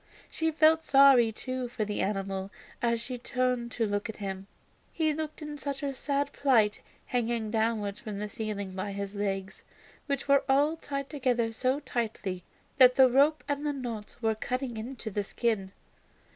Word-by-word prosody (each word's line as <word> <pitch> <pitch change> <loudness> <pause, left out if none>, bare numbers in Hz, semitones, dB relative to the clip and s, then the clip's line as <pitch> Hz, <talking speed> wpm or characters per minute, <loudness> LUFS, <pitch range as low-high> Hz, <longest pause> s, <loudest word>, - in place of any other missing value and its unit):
She 320 0 0
felt 320 +1 +4
sorry, 270 -5 +6
too, 255 +3 -4
for 235 -3 -3
the 210 0 -2
animal 195 -1 -2 0.3
as 235 -1 +1
she 245 +1 -5
turned 250 -1 -1
to 230 - +1
look 205 +1 -2
at 220 - -6
him. 195 -1 -5 0.4
He 315 -2 +1
looked 310 +1 -5
in 300 -1 -6
such 280 0 -4
a 280 -1 -1
sad 280 +1 -1
plight 225 -7 +3 0.2
hanging 235 -3 -1
downwards 220 -3 0
from 210 -2 -6
the 210 +1 -3
ceiling 205 -2 -4
by 195 +2 -4
his 200 0 -4
legs, 195 -2 -3 0.4
which 280 -1 -2
were 280 0 +5
all 290 +4 +4
tied 275 -4 -4
together 250 -6 0
so 255 +5 0
tightly 215 -8 -3 0.4
that 250 -1 +8
the 260 -2 +6
rope 285 +4 +4
and 285 0 -1
the 295 -1 0
knots 235 -6 -6
were 220 0 +3
cutting 250 +2 -3
into 225 0 -6
the 205 - -1
skin. 200 -2 -1
240 Hz, 170 wpm, -29 LUFS, 210-275 Hz, 0.4 s, that